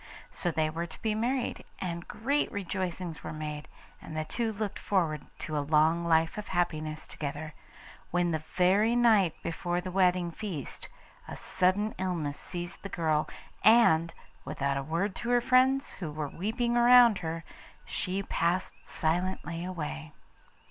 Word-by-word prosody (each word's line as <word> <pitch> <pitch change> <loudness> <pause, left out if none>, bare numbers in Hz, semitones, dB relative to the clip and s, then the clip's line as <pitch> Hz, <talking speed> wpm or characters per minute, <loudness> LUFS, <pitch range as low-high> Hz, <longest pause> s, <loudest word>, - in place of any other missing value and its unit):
So 175 - +1
they 160 -2 +1
were 165 +2 -3
to - - -13
be 220 -1 +1
married, 240 +4 -1
and 170 -2 -4
great 280 +6 0
rejoicings 185 -4 -4
were - - -5
made, 150 -1 -5 0.3
and 155 - -7
the 155 - -1
two 230 +6 -1
looked 210 -1 -4
forward 165 -7 0 0.2
to 155 - -3
a - - +2
long 155 +3 +3
life 165 +2 +2
of 210 - -7
happiness 155 -3 -1
together, 150 +1 -5 0.6
when 175 0 +1
the 160 -1 -1
very 200 +6 +4
night 220 -8 +4
before 175 +1 -2
the 185 +1 -5
wedding 180 -2 +2
feast 180 - -6 0.4
a - - -7
sudden 190 +3 +1
illness 170 -6 -2
seized 175 +1 -5
the 200 - -6
girl, 155 -4 0 0.3
and, 170 -8 +6 0.3
without 140 0 -1
a 135 - -1
word 170 +7 -1
to 235 - -4
her 245 0 +5
friends 260 +2 +3
who 170 -5 -5
were 150 -1 -4
weeping 230 - -1
round 240 -3 +7
her, 165 -1 -4 0.4
she 190 +2 -2
passed 175 +1 0
silently 170 0 -2
away. 160 -3 -5
175 Hz, 155 wpm, -29 LUFS, 160-205 Hz, 0.6 s, round